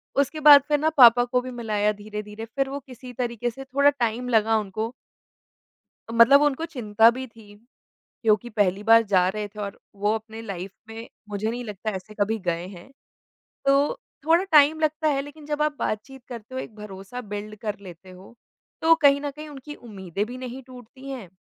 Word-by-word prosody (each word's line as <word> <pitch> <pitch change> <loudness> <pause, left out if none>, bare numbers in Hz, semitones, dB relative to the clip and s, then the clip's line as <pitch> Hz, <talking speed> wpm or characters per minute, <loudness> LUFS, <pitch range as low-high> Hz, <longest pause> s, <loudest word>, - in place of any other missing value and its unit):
उसके 280 +3 0
बाद 290 -1 +9
फिर 295 -1 +2
ना 315 +1 +2
पापा 245 -1 +8
को 250 0 0
भी 255 0 -7
मिलाया 210 -3 0
धीरे-धीरे, 210 +1 -7
फिर 270 +4 -2
वो 280 +1 -4
किसी 255 -1 -12
तरीक़े 240 -1 -2
से 270 +3 -9
थोड़ा 280 +2 +3
टाइम 250 -2 -2
लगा 225 -1 +3
उनको। 215 +3 -4 1.2
मतलब 245 +5 +7
उनको 295 +2 +1
चिंता 225 -7 +3
भी 260 +2 -6
थी 215 -3 -17 0.7
क्योंकि 220 +2 +2
पहली 205 -2 0
बार 225 +1 +6
जा 180 -1 +4
रहे 210 +1 -4
थे 210 +1 -17
और 200 -1 -6 0.2
वो 205 +2 +1
अपने 220 0 -7
लाइफ़ 195 -2 -6 0.2
में 225 +1 -9 0.2
मुझे 210 +2 -2
नहीं 245 +1 -5
लगता 210 0 -5
ऐसे 215 +3 -10
कभी 220 +2 +1
गए 170 +1 -1
हैं। 185 +6 -13 0.8
तो 285 - +3 0.3
थोड़ा 335 +4 +4
टाइम 305 +1 +6
लगता 310 0 0
है 275 -2 +1
लेकिन 290 +1 -12
जब 300 0 -1
आप 300 -1 0
बातचीत 250 +4 -4
करते 240 +1 -9
हो, 260 - -2
एक 220 - -9
भरोसा 210 +3 -8
बिल्ड 210 0 -7
कर 210 -2 -4
लेते 185 -1 -13
हो, 185 +5 -15 0.5
तो 330 0 +6
कहीं 280 0 +5
न 290 -1 -3
कहीं 305 +2 -10
उनकी 295 +1 -9
उम्मीदें 200 - -5
भी 250 +2 -8
नहीं 255 +1 -7
टूटती 255 +2 -13
हैं 240 -9 -7
235 Hz, 190 wpm, -24 LUFS, 210-275 Hz, 1.2 s, बाद